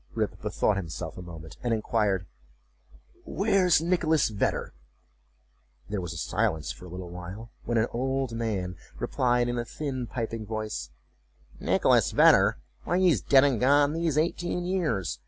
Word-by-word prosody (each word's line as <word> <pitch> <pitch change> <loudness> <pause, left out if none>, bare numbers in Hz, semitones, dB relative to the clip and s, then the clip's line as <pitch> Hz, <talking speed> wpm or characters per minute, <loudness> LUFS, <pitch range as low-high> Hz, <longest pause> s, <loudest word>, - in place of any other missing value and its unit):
Rip - - -2
bethought 105 - +1
himself 85 -2 -5
a - - -8
moment, 80 -2 -10
and 120 -2 +1
inquired, 105 -4 0 1.0
"Where's 195 -5 +2
Nicholas 165 -5 +2
Vedder?"There 65 - -6
was 90 -2 -5
a 85 - -6
silence 80 -1 -1
for 90 - -11
a - - -9
little 90 0 -7
while, 95 +6 -8
when 120 0 0
an 110 - +3
old 130 +1 -1
man 105 -6 -3 0.2
replied, 125 -1 +1
in 120 0 -1
a - - -1
thin 130 -2 -4
piping 115 -2 -4
voice, 110 - -4 0.7
"Nicholas - - +3
Vedder! - - +6 0.3
why, 175 - 0
he 185 -1 +5
is 120 - +1
dead 135 +5 +5
and 135 -6 +2
gone 145 +3 +4
these 165 -2 0
eighteen 175 +2 0
years! 155 - -1
115 Hz, 150 wpm, -27 LUFS, 90-145 Hz, 1.0 s, Vedder